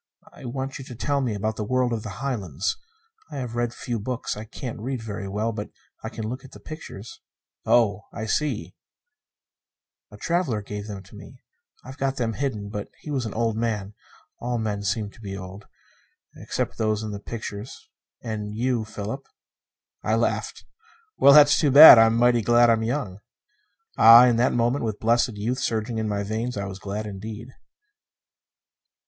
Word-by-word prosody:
I - - -13
want 135 +2 -4
you 135 - -8
to 125 - -9
tell 140 +4 -1
me 120 -5 -1
about 110 +2 -2
the 110 - -2
world 125 +2 0
of 110 - -2
the 105 0 -8
Highlands. 95 - -2 0.5
I 150 - -9
have 125 -3 -5
a 120 0 0
few 120 0 -5
books. 125 +4 -3
I 105 +1 -7
can't 115 +1 -7
read 130 +2 -3
very 105 -2 -5
well, 105 +3 -1
but 105 -1 -6 0.3
I - - -4
can 110 -1 -6
look 125 +4 -6
at 135 - -14
the - - -11
pictures." 135 -9 -10 0.5
"Oh, 105 -3 +3
I 110 - -5
see 150 +7 -2 0.7
" - - -66
"A - - -12
traveler 165 - -1
gave 105 0 -6
them 100 -2 -7
to 95 - -16
me. - - -13 0.4
I've 130 +2 -10
got 135 0 0
them 115 -4 -1
hidden. 110 -5 -3
But 105 0 -5
he 150 - -7
was 130 -5 -1
an 105 - -7
old 115 -1 0
man: 105 -3 -2 0.5
all 120 0 -2
men 105 -3 -2
seem 100 +1 -2
to - - -18
be 100 -2 -6
old 95 +2 -10 0.7
except - - -4
those 110 -1 0
in 110 - -4
the 100 - -5
pictures, 110 +2 -8 0.4
and 105 -2 -5
you, 120 0 0
Philip." 110 +6 -6 0.7
I - - 0
laughed. - - -2 0.5
"Well, 140 - +7
that's 145 -1 +7
too 150 - +3
bad. 140 -3 +11
I'm 115 0 +5
mighty 120 0 +4
glad 120 +2 +5
I'm 110 -1 +2
young." 110 -5 -3 0.8
Ah, 115 +2 +10
in 120 -2 +3
that 120 +2 +3
moment, 120 +3 +1
with 110 -2 -3
blessed 115 0 +2
youth 115 +6 -2
surging 110 -1 -2
in 110 -1 -2
my 100 -1 -1
veins, 110 +3 -3
I 100 - -2
was 95 0 -7
glad 105 +2 -5
indeed! 105 +4 -7
115 Hz, 185 wpm, -24 LUFS, 105-125 Hz, 0.8 s, bad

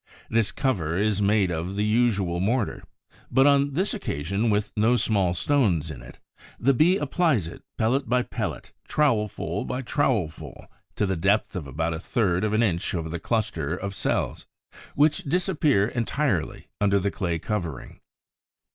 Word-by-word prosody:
This 110 -2 +2
cover 90 - -1
is 105 0 +1
made 100 -2 +2
of 85 +4 -3
the 105 +1 0
usual 105 -6 +1
mortar, 110 +4 0 0.5
but 135 +2 +4
on 140 0 +4
this 185 +8 0
occasion 100 - -2
with 105 0 0
no 110 +3 +3
small 100 -6 +1
stones 90 - +1
in 65 -5 -9
it. - - -13 0.4
The 135 +4 +3
Bee 170 +8 +4
applies 145 - +1
it 85 - -9 0.2
pellet 130 +4 +1
by 125 +1 +2
pellet, - - -5 0.2
trowelful 115 -9 0
by 130 +1 -3
trowelful, 120 - -1 0.3
to 105 - +1
the 95 -1 0
depth 100 +6 +1
of 85 -6 -4
about 80 +5 -2
a 80 - -4
third 95 -1 0
of 110 -1 0
an 110 +2 +3
inch 90 -4 0
over 80 -2 -3
the 85 +1 -4
cluster 85 -8 -1
of 100 +1 -5
cells, - - -2 0.5
which 150 +1 +4
disappear 150 - +1
entirely 120 - -1 0.2
under 100 -1 +3
the 100 +1 0
clay 85 -4 -2
covering. 85 - -4
105 Hz, 160 wpm, -25 LUFS, 85-125 Hz, 0.5 s, but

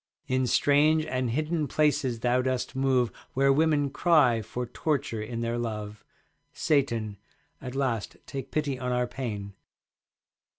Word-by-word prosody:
In 130 0 +1
strange 150 +5 +4
and 130 -5 -1
hidden 155 +4 -1
places 140 -6 +1
thou 125 +1 +2
dost 130 -1 -2
move 130 -3 +2 0.2
Where 135 +1 +4
women 145 -2 +2
cry 145 -8 +4
for 125 +4 -4
torture 135 -2 -2
in 115 +2 -4
their 115 +1 -1
love. 105 -2 -5 0.5
Satan, 115 -8 0 0.4
at 130 -1 -6
last 125 -6 -1
take 135 -1 -6
pity 145 -4 -1
on 125 -1 -2
our 125 0 +1
pain. 105 -6 -5
130 Hz, 135 wpm, -27 LUFS, 115-145 Hz, 0.5 s, strange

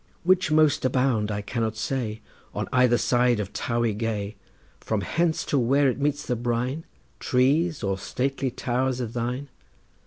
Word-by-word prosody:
Which 185 -1 +3
most 155 -2 +3
abound, 125 -4 +1
I 105 -1 -3
cannot 110 0 -2
say, 110 -2 -2 0.3
On - - -2
either 125 -1 +4
side 120 -2 +2
of 100 -2 -4
Towey 120 -2 0
gay, 105 -1 -3 0.4
From 110 -2 -2
hence 165 +7 0
to 140 - +1
where 135 +3 +3
it 125 - -7
meets 145 0 0
the 125 - 0
brine, 120 +6 -2 0.3
Trees 145 +4 +2
or 95 -1 -1
stately 135 +5 -2
towers 125 +1 -1
of 120 -2 -4
thine? 125 +4 -3
125 Hz, 155 wpm, -25 LUFS, 115-135 Hz, 0.4 s, either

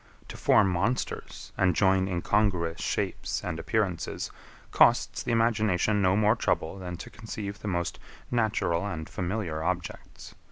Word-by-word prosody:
To - - -7
form 100 -3 +4
monsters, 100 +8 -2
and 90 -3 +3
join 95 -1 +3
incongruous 90 -2 0
shapes - - -2
and 80 - -3
appearances, 95 -6 -1 0.4
costs - - +4
the - - -2
imagination 110 -3 +2
no 95 0 +3
more 105 +2 +4
trouble 95 -4 -1
than 90 -2 -6
to - - -9
conceive 105 -2 -6
the - - -6
most 85 -3 -2 0.3
natural 110 -8 +1
and 80 -5 -5
familiar 90 -4 -3
objects. 90 +1 -4
95 Hz, 135 wpm, -28 LUFS, 85-110 Hz, 0.4 s, form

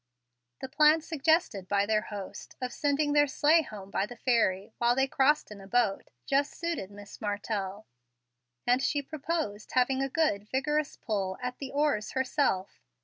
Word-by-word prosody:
The - - -4
plan 300 +4 +5
suggested 315 - +1
by 200 +1 +2
their 215 0 +2
host, 205 -3 -8
of 250 -1 -4
sending 290 0 +1
their 290 0 +5
sleigh 300 +4 +4
home 200 -8 -9
by 195 - 0
the 245 - -9
ferry, 225 -5 +1
while 240 0 +3
they 265 +1 +3
crossed 270 0 +2
in 205 -1 -9
a 195 - -12
boat, 230 -3 +1 0.2
just 280 +1 +1
suited 335 - -3
Miss 205 0 -12
Martell, 205 -1 -3 0.8
and 250 +2 +3
she 285 +1 0
proposed 300 -7 -4
having 260 +1 +2
a 270 - 0
good 215 -9 0
vigorous 295 +2 0
pull 195 -4 -2
at 250 0 -5
the 275 - -5
oars 285 -7 0
herself. 260 -7 0
250 Hz, 165 wpm, -29 LUFS, 205-290 Hz, 0.8 s, plan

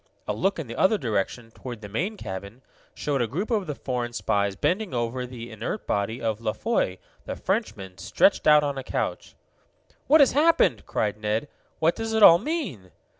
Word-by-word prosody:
A 105 - 0
look 190 - 0
in 160 - -4
the 115 -1 -7
other 200 +3 +3
direction, 115 - -2
toward 120 -1 -8
the 105 - -7
main 185 - -2
cabin, 100 - -7 0.3
showed 140 -3 -1
a 120 - +1
group 185 - -3
of 205 -5 0
the 150 - -3
foreign 125 -3 -3
spies 100 -2 0
bending 185 - -1
over 120 +2 -2
the 120 -1 -9
inert 110 - -5
body 105 +4 -1
of 110 -1 -2
La 110 -2 -1
Foy, 225 - 0 0.3
the - - -4
Frenchman, 95 -1 -3
stretched 200 - +2
out 150 -1 +7
on 140 -2 -2
a - - -6
couch. - - -3 0.7
"What 310 +3 +6
has 280 - +6
happened?" 290 - +3
cried 105 -1 -1
Ned. 110 +5 -1 0.3
"What 165 +2 +2
does 225 0 -3
it 220 -1 +3
all 170 -3 +10
mean?' 275 - -4
125 Hz, 190 wpm, -25 LUFS, -, 0.7 s, all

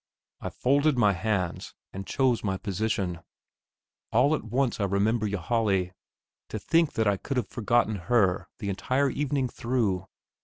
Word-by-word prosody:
I - - -4
folded 140 +2 +2
my 105 -4 +4
hands 95 -2 -2 0.2
and 95 0 -6
chose 130 -3 +1
my 95 -2 -1
position. 100 -3 -2 0.9
All 130 +7 +4
at 155 - -1
once 120 +2 0
I 100 - +1
remember 105 +3 +1
Ylajali. 100 -1 0 0.6
To - - -4
think 165 +9 +2
that 110 - +1
I 100 -1 +2
could 135 +7 -4
have 120 - -1
forgotten 120 -2 +1
her 95 -7 +2
the 100 - -4
entire 130 +8 0
evening 140 -1 0
through! 115 -7 -1
110 Hz, 150 wpm, -27 LUFS, 100-125 Hz, 0.9 s, my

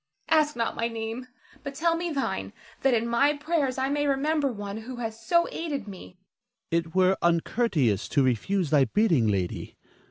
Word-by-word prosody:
Ask 305 -2 +3
not 230 -1 -1
my 230 - 0
name, 230 +2 -5 0.3
but 280 -1 -7
tell 330 +3 +2
me 345 +1 -2
thine, 275 -3 -2 0.3
that 270 -2 +3
in 230 +1 0
my 275 +5 +3
prayers 290 -4 0
I 265 +1 0
may 290 +1 0
remember 285 +1 +1
one 205 -2 -6
who 240 +4 -7
has 225 -1 -6
so 340 +8 +3
aided 285 -9 -4
me. 185 -2 -10 0.6
Ernest. 165 0 +1
It 165 - -16
were 185 0 +4
uncourteous 170 - +1
to 140 - +3
refuse 145 - 0
thy 145 -3 +5
bidding, 160 - +2
lady. 95 -4 -2
230 Hz, 180 wpm, -27 LUFS, 185-280 Hz, 0.6 s, thy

